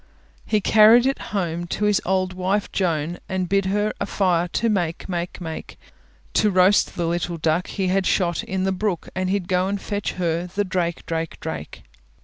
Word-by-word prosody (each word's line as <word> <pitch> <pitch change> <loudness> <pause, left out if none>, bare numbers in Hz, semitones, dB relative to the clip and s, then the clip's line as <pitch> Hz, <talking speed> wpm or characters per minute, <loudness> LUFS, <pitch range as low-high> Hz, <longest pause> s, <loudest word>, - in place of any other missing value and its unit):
He 215 -1 +2
carried 220 +4 +6
it 270 +1 +1
home 175 -3 -2
To 210 - -1
his 210 -1 +3
old 185 0 +1
wife 190 +3 -1
Joan, 170 -2 -1
And 185 -1 -1
bid 195 +1 +1
her 205 +2 0
a 200 - -1
fire 180 -4 +1
for - - -26
to 230 - +1
make, 175 -5 -1
make, 175 -1 -4
make; 160 -3 -7 0.6
To 215 - +3
roast 185 +1 +4
the 170 - -1
little 170 0 -1
duck 160 +2 0
He 190 -3 -2
had 190 0 +1
shot 175 -3 +1
in 190 0 -2
the 190 - +1
brook, 190 -2 -2
And 185 0 -1
he'd 195 -2 -1
go 185 -1 +1
and 200 +1 -2
fetch 205 0 -3
her 170 -1 -1
the 200 +3 -1
drake, 180 -3 -2
drake, 165 -1 -3
drake. - - -6
185 Hz, 195 wpm, -23 LUFS, 175-200 Hz, 0.6 s, carried